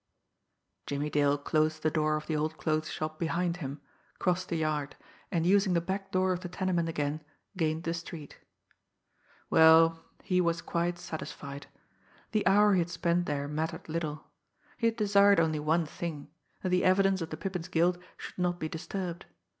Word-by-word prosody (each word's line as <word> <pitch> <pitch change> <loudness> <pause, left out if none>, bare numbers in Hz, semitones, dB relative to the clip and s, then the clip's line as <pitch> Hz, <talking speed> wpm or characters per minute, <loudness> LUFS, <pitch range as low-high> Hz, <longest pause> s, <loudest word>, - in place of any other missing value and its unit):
Jimmie 145 +1 -2
Dale 145 -1 +3
closed 155 +2 0
the 155 - +2
door 155 -1 +1
of 155 - -4
the 160 - -2
old 155 +1 -1
clothes 155 0 -1
shop 155 0 -4
behind 170 +1 0
him, 140 -3 -6 0.4
crossed 180 0 0
the 170 - -1
yard, 150 -2 -1 0.4
and 170 -3 +1
using 195 0 +4
the 170 - +3
back 195 +3 -4
door 185 0 +2
of 180 - -3
the 180 - -7
tenement 180 -2 0
again; 150 -1 -2 0.3
gained 160 -2 0
the 165 - -1
street. 165 -3 -8 1.1
Well, 165 0 +6 0.2
he 180 -2 +2
was 170 -1 +1
quite 175 0 -1
satisfied! 140 -4 -7 0.6
The 215 -4 +1
hour 205 +1 +6
he 185 - +4
had 170 0 0
spent 175 0 0
there 145 -1 -2
mattered 160 +3 -3
little. 155 -2 -3 0.5
He 230 - +1
had 225 - 0
desired 200 -3 +5
only 160 -2 +1
one 160 +3 +1
thing 155 -2 -6 0.3
that 185 - 0
the 180 0 +2
evidence 190 0 +3
of 165 - -3
the - - -5
Pippin's 180 -3 -4
guilt 175 0 +2 0.2
should - - -9
not 175 -1 0
be 155 - -2
disturbed. 175 +2 -5
165 Hz, 175 wpm, -30 LUFS, 155-180 Hz, 1.1 s, Well